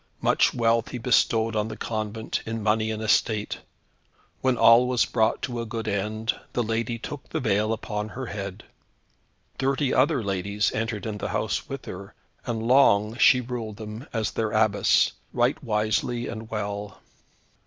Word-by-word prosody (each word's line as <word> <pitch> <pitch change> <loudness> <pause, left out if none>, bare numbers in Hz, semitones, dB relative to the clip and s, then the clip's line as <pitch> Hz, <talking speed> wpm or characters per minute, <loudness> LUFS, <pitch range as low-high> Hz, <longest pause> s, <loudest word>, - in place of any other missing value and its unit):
Much - - +3
wealth 115 -1 +2
he 125 - -5
bestowed 115 -2 +2
on 105 0 0
the 110 - -7
convent, 110 0 -3
in 115 -1 -3
money 110 +1 +2
and 110 0 -3
estate. 110 -1 +1 0.8
When 130 -2 +2
all 115 +3 +7
was 125 -1 +2
brought 110 0 +1
to 120 -2 -2
a - - -4
good 115 0 -4
end, 110 +2 -1 0.2
the 120 - +1
lady 115 +1 -1
took 135 +4 -8
the - - -2
veil 110 -2 +1
upon 105 -1 -3
her 130 +4 -6
head. 100 -3 -6 1.0
Thirty 135 0 +1
other 135 -1 +3
ladies 100 +1 0
entered 110 -1 -3
in 105 -2 -4
the - - -3
house - - -2
with - - -6
her, 95 +2 -8 0.3
and 115 -2 -2
long 115 -4 +4
she 130 -1 +6
ruled 115 -4 -5
them 110 +4 -8
as 110 -2 -1
their 110 -1 -1
Abbess, 110 -1 +3 0.2
right - - +1
wisely 110 +2 0
and 110 -1 -7
well. 105 -1 -4
110 Hz, 165 wpm, -25 LUFS, 105-120 Hz, 1.0 s, all